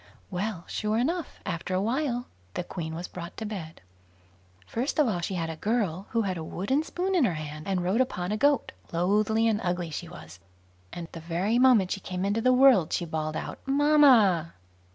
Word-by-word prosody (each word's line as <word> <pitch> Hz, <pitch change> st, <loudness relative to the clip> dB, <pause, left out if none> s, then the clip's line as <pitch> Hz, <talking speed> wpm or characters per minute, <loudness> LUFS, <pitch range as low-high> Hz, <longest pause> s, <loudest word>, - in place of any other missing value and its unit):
Well, 185 Hz, -1 st, -3 dB
sure 215 Hz, +1 st, -1 dB
enough, 325 Hz, +8 st, -2 dB
after 180 Hz, 0 st, -3 dB
a -, -, +2 dB
while 245 Hz, +1 st, -1 dB, 0.3 s
the -, -, -2 dB
Queen 160 Hz, -3 st, -5 dB
was 175 Hz, +2 st, -5 dB
brought 170 Hz, 0 st, -8 dB
to 220 Hz, -, -4 dB
bed. 180 Hz, -7 st, -7 dB, 0.8 s
First 245 Hz, -, -2 dB
of 300 Hz, -4 st, +4 dB
all, 195 Hz, -6 st, 0 dB
she 180 Hz, +3 st, -3 dB
had 165 Hz, -2 st, -2 dB
a -, -, -6 dB
girl 200 Hz, -1 st, -1 dB
who 230 Hz, -1 st, +1 dB
had 185 Hz, -3 st, -2 dB
a -, -, -5 dB
wooden 200 Hz, -, -1 dB
spoon 360 Hz, +4 st, -2 dB
in 355 Hz, -6 st, +4 dB
her 185 Hz, -9 st, +1 dB
hand, 155 Hz, 0 st, -7 dB
and 190 Hz, -2 st, 0 dB
rode 195 Hz, +8 st, +2 dB
upon 180 Hz, -7 st, -2 dB
a -, -, +1 dB
goat; 280 Hz, +3 st, +2 dB, 0.2 s
loathly 210 Hz, +6 st, +2 dB
and 220 Hz, -1 st, +1 dB
ugly 175 Hz, -2 st, -2 dB
she 165 Hz, +2 st, -5 dB
was, 90 Hz, -, -12 dB, 0.5 s
and 170 Hz, -1 st, -6 dB
the 165 Hz, -, -8 dB
very 180 Hz, +8 st, 0 dB
moment 245 Hz, -8 st, +5 dB
she -, -, -1 dB
came 185 Hz, 0 st, -4 dB
into 205 Hz, +3 st, 0 dB
the 255 Hz, +2 st, +4 dB
world, 250 Hz, -, +5 dB
she 175 Hz, -, -1 dB
bawled 155 Hz, -1 st, -3 dB
out -, -, -5 dB
"Mamma". 270 Hz, -, +5 dB
195 Hz, 200 wpm, -27 LUFS, 170-240 Hz, 0.8 s, moment